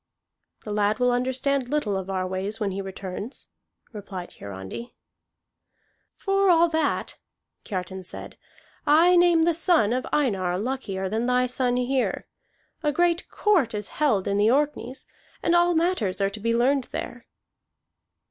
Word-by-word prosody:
"The 210 - -5
lad 210 +1 +1
will 250 +1 +2
understand 260 +1 0
little 270 -9 0
of 190 0 -4
our 185 -1 -1
ways 190 +4 -3
when 205 -3 -1
he 195 +1 -3
returns," 195 +4 -7 0.4
replied 195 -4 -7
Hiarandi. 100 - -8 1.2
"For 390 0 +1
all 340 -1 +5
that," 315 -2 -1 0.5
Kiartan 190 -1 -5
said, 180 - -9 0.5
"I 335 +5 +6
name 345 -2 +5
the 340 +1 +3
son 320 - +3
of 255 +1 -2
Einar 190 -11 +1
luckier 200 -4 -3
than 220 +5 -1
thy 250 0 +3
son 250 0 0
here. 250 +1 -1 0.6
A 300 -2 +1
great 345 +2 +1
court 335 - +1
is 210 -1 -3
held 240 -11 +1
in 200 0 +1
the 210 +2 +4
Orkneys, 270 -2 -1 0.4
and 340 - +3
all 345 0 +4
matters 320 - 0
are 195 0 +1
to 215 - -7
be 230 +2 0
learned 260 +2 +2
there." 245 -1 -7
245 Hz, 150 wpm, -25 LUFS, 200-295 Hz, 1.2 s, I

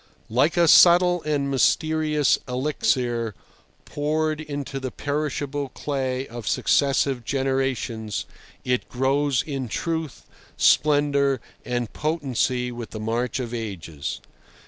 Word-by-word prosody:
Like 140 +9 +2
a 170 -1 +5
subtle 175 +2 +7
and 140 -2 0
mysterious 155 +1 +2
elixir 125 -4 0 0.5
poured 155 +1 -1
into 145 -2 -5
the 130 -1 -4
perishable 145 0 -3
clay 130 -1 -3
of 120 -2 -8
successive 135 -3 +2
generations, 130 -5 -1 0.4
it 125 0 -1
grows 135 +1 +1
in 135 -4 -4
truth, 160 +4 -3 0.3
splendour, 145 -2 +3 0.2
and 120 -2 -3
potency 130 -5 -1
with 120 -1 -7
the 110 - -7
march 115 +4 -1
of 120 -2 -4
ages. 90 -10 -5
135 Hz, 105 wpm, -24 LUFS, 125-150 Hz, 0.5 s, subtle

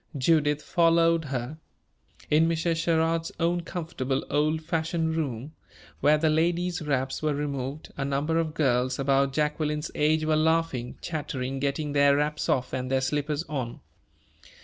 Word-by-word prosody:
Judith 150 +1 +2
followed 165 -1 +3
her. 130 +2 -4 0.7
In 160 +2 +4
Mrs. 165 0 0
Sherrard's 165 0 +1
own 175 +1 +1
comfortable 160 -7 -3
old 155 +2 +1
fashioned 160 0 -1
room, 140 -2 -3 0.5
where 150 +1 +4
the 160 +1 +1
ladies' 170 +3 +1
wraps 135 -3 -1
were 155 -2 0
removed, 140 0 -4
a 140 - -1
number 140 +4 0
of 160 -1 -2
girls 130 -4 +1
about 135 0 +2
Jacqueline's 150 +1 -1
age 155 +1 +2
were 155 0 +2
laughing, 155 -6 0
chattering, 135 -5 -3
getting 145 +2 -1
their 140 -1 +5
wraps 150 +1 -1
off 125 -2 0
and 130 0 -2
their 135 0 +2
slippers 145 +3 -1
on. 130 -8 -5
150 Hz, 145 wpm, -27 LUFS, 140-160 Hz, 0.7 s, their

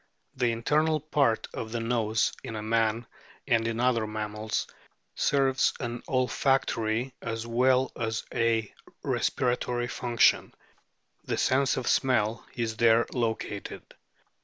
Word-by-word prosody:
The 120 -1 +1
internal 155 +7 +1
part 140 -6 +1
of 110 - -5
the 120 - -2
nose 115 -2 0
in 110 -1 -5
man 115 0 +1 0.4
and 115 -3 +2
in 115 0 -2
other 120 -3 +2
mammals 110 0 -3 0.5
serves 135 -2 +2
an 120 -1 -4
olfactory 130 -2 +1
as 115 0 -4
well 130 +2 +2
as 110 -1 -2
a 115 -2 +1 0.3
respiratory 120 -1 0
function. 120 -1 +2 0.7
The - - -2
sense 135 +1 +2
of 130 - -3
smell 115 -4 +1
is 115 -2 -2
there 115 0 +5
located. 110 -4 -4
115 Hz, 115 wpm, -28 LUFS, 110-130 Hz, 0.7 s, there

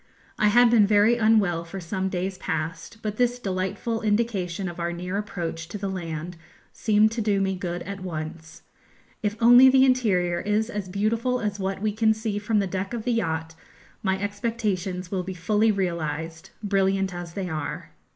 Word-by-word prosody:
I 210 - +4
had 240 +2 +5
been 215 -4 +5
very 210 +3 +4
unwell 210 -7 +3
for 170 +3 -7
some 190 +2 -2
days 185 +1 -2
past, 160 +5 -4
but 210 -1 -3
this 245 0 +2
delightful 195 +2 -2
indication 205 -4 0
of 175 -1 -7
our 170 0 -1
near 180 +2 -4
approach 175 -5 -4
to 210 - -5
the 195 -1 -3
land 170 -1 -5 0.4
seemed 215 0 +3
to 230 0 -2
do 205 -2 +1
me 190 0 0
good 175 -1 -4
at 200 0 -6
once. 160 -2 -7 0.6
If 210 0 -1
only 245 +3 +8
the 265 0 +6
interior 190 -10 +2
is 210 +4 0
as 205 -4 -4
beautiful 225 +6 0
as 210 -2 -3
what 195 +1 -3
we 215 - +2
can 220 +1 +2
see 215 -2 -2
from 210 +1 0
the 200 - +2
deck 190 +4 -3
of 225 - -4
the 245 - 0
yacht, 160 -7 -1 0.5
my 190 -1 0
expectations 200 -3 -2
will 190 -2 0
be 185 +1 -6
fully 215 +5 +2
realised, 165 -4 -3
brilliant 195 -2 +1
as 175 -1 -7
they 195 -2 -3
are. 155 -4 -5
195 Hz, 180 wpm, -25 LUFS, 175-215 Hz, 0.6 s, only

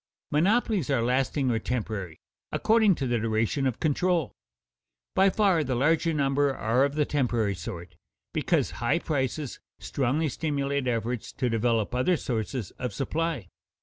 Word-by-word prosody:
Monopolies 195 - +2
are 135 -5 +2
lasting 130 +2 +1
or 115 - +1
temporary, 105 -8 -3 0.3
according 220 -4 +4
to 135 - -3
the 120 -2 +1
duration 115 +5 0
of 125 - -2
control. 170 0 +1 0.8
By 195 +1 +5
far 190 -5 +3
the 130 -2 -1
larger 160 +6 +2
number 140 -2 +1
are 115 +5 +2
of 140 0 0
the 150 -1 +2
temporary 120 -8 0
sort, 85 0 -7 0.4
because - - +1
high - - +2
prices 140 -1 -2 0.2
strongly 140 +4 0
stimulate 140 -1 -1
efforts 120 -1 -2
to 125 -2 -1
develop 115 -1 +1
other 130 +8 +2
sources 115 -3 -3
of 125 -5 -3
supply. 150 - -2
135 Hz, 145 wpm, -27 LUFS, 115-155 Hz, 0.8 s, By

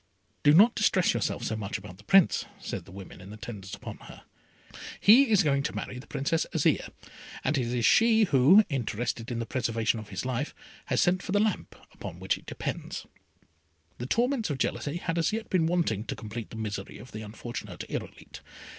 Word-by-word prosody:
"Do 145 - +6
not 210 +10 +7
distress 190 -4 +3
yourself 120 -3 -2
so 110 - -1
much 105 -2 -3
about 95 -2 -11
the - - -15
Prince," 190 - +4
said - - -5
the - - -14
women 95 -1 -10
in 95 +2 -11
attendance 105 -2 -7
upon - - -8
her, - - -13 0.8
"he 245 +5 +7
is 205 -3 +5
going 140 -3 +2
to 140 - -3
marry 125 - -5
the 130 - -12
Princess 140 +3 -1
Azire, - - +2 0.5
and 155 - +1
it 125 -4 0
is 120 -1 0
she 225 -1 +5
who, 165 +5 +6
interested 120 -3 -3
in 120 - -3
the 115 - -2
preservation 115 -2 0
of 110 - -10
his 95 +4 -4
life, 130 +3 -2 0.3
has 130 -3 0
sent 180 +1 +3
for - - -6
the 205 - +4
lamp 215 -2 -1 0.3
on 85 - -6
which 95 0 0
it - - -15
depends." - - -5 0.9
The 120 - -4
torments 240 - +1
of 145 - -2
jealousy 145 +3 -2
had 170 -1 -2
as 165 - +2
yet 220 0 -4
been 170 -4 +3
wanting, 165 - 0
to - - -4
complete 110 0 -7
the - - -10
misery 110 -2 -5
of 125 - -12
the 110 - -6
unfortunate 110 +3 -7
Irolite. - - -7
130 Hz, 200 wpm, -28 LUFS, 110-180 Hz, 0.9 s, not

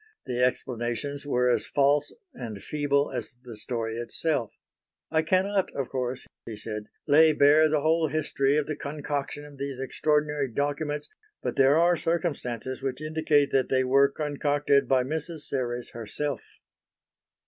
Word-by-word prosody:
The 125 -2 0
explanations 125 +3 -2
were 125 -2 +2
as 125 - +2
false 145 +1 +2 0.2
and 110 - -7
feeble 145 -1 0
as 125 -1 -5
the 120 -3 -9
story 115 +1 -3
itself. 120 0 -1 0.6
"I 160 0 +3
cannot 190 +4 +1
of 135 -3 -2
course," 130 -1 -3 0.2
he 115 - -5
said, 105 0 -5 0.2
"lay 155 +2 +6
bare 150 +2 +5
the 150 -1 +1
whole 160 +1 +2
history 145 -2 +1
of 150 - +1
the 155 - -3
concoction 145 0 -4
of 145 -2 -14
these 140 -1 -4
extraordinary 150 +1 0
documents, 145 +3 -2 0.4
but - - -2
there 135 +2 +5
are 175 +1 +4
circumstances 135 - -2
which 135 -1 -3
indicate 155 -2 +1
that 135 -1 +2
they 130 -1 +3
were 135 +2 +4
concocted 145 -1 +1
by 130 -1 +3
Mrs. 155 +3 -4
Serres 125 -4 -3
herself." 120 +3 -5
140 Hz, 150 wpm, -27 LUFS, 125-150 Hz, 0.6 s, lay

